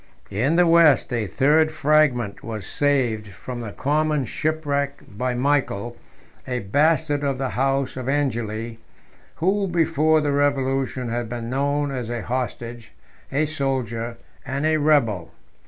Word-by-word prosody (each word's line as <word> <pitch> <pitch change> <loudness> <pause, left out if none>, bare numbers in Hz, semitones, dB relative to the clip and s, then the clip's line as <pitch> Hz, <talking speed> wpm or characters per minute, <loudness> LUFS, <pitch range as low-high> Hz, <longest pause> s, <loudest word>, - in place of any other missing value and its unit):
In 125 +11 +1
the 175 +1 +5
West, 165 -6 +5
a 115 -3 -1
third 155 +7 +3
fragment 145 -8 +2
was 110 -4 -5
saved 125 -7 0
from 105 +6 -7
the 110 -3 -6
common 150 +2 0
shipwreck 140 0 -2
by 125 +5 -3
Michael, 125 -4 0 0.5
a 125 -1 -2
bastard 145 +6 +2
of 140 -2 0
the 135 0 -2
house 135 +1 0
of 130 0 -4
Angeli, 115 -5 -2 0.6
who, 195 +4 +1
before 160 -2 +2
the 150 -1 0
revolution, 135 -3 0
had 120 -1 -3
been 120 0 -5
known 140 +2 0
as 125 -4 -4
a 120 -3 -3
hostage, 120 0 -4 0.4
a 145 +3 +2
soldier, 125 -6 -2 0.3
and 140 +2 -2
a 155 0 +3
rebel. 130 - +2
135 Hz, 140 wpm, -23 LUFS, 120-145 Hz, 0.6 s, the